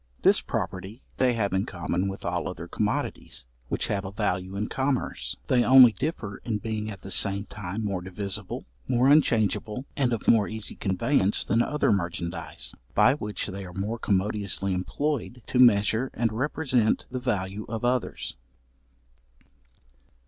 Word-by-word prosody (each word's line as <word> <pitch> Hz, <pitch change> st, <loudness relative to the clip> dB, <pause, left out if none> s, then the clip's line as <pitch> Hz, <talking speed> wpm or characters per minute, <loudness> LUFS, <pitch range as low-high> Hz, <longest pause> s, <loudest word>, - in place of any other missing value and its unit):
This -, -, +5 dB
property 95 Hz, +6 st, -4 dB
they 125 Hz, -1 st, +3 dB
have 100 Hz, -5 st, 0 dB
in 95 Hz, +1 st, 0 dB
common 95 Hz, +2 st, -2 dB
with 95 Hz, 0 st, -6 dB
all -, -, -1 dB
other -, -, -6 dB
commodities -, -, -2 dB, 0.2 s
which -, -, 0 dB
have 100 Hz, -1 st, -1 dB
a 95 Hz, -, -6 dB
value 95 Hz, -2 st, -2 dB
in 105 Hz, +2 st, -1 dB
commerce. 135 Hz, -1 st, -1 dB
They 125 Hz, -2 st, +3 dB
only 130 Hz, -1 st, +9 dB
differ 110 Hz, -, -4 dB
in 110 Hz, -3 st, -3 dB
being 110 Hz, 0 st, -3 dB
at 100 Hz, -3 st, -8 dB
the 95 Hz, -, -8 dB
same 100 Hz, +2 st, +2 dB
time 105 Hz, +1 st, -5 dB
more 95 Hz, -3 st, -2 dB
divisible, 95 Hz, +1 st, -3 dB, 0.2 s
more 125 Hz, +1 st, +3 dB
unchangeable, 115 Hz, -4 st, +2 dB
and 130 Hz, -4 st, +1 dB
of 115 Hz, -, -3 dB
more 110 Hz, -3 st, +5 dB
easy 110 Hz, -1 st, -4 dB
conveyance 100 Hz, +2 st, +1 dB
than 115 Hz, -, +2 dB
other 150 Hz, 0 st, +1 dB
merchandize, 85 Hz, -3 st, -2 dB, 0.2 s
by -, -, +6 dB
which 105 Hz, -7 st, -3 dB
they 100 Hz, -1 st, -5 dB
are 90 Hz, -1 st, -9 dB
more 105 Hz, +5 st, -3 dB
commodiously 100 Hz, -1 st, 0 dB
employed 125 Hz, +5 st, -2 dB
to 125 Hz, -, -1 dB
measure 110 Hz, +1 st, +5 dB
and 115 Hz, -1 st, 0 dB
represent 130 Hz, -2 st, +1 dB
the 130 Hz, -, -2 dB
value 105 Hz, -4 st, -2 dB
of 115 Hz, 0 st, -3 dB
others. 125 Hz, -, -1 dB
105 Hz, 155 wpm, -27 LUFS, 95-125 Hz, 0.2 s, only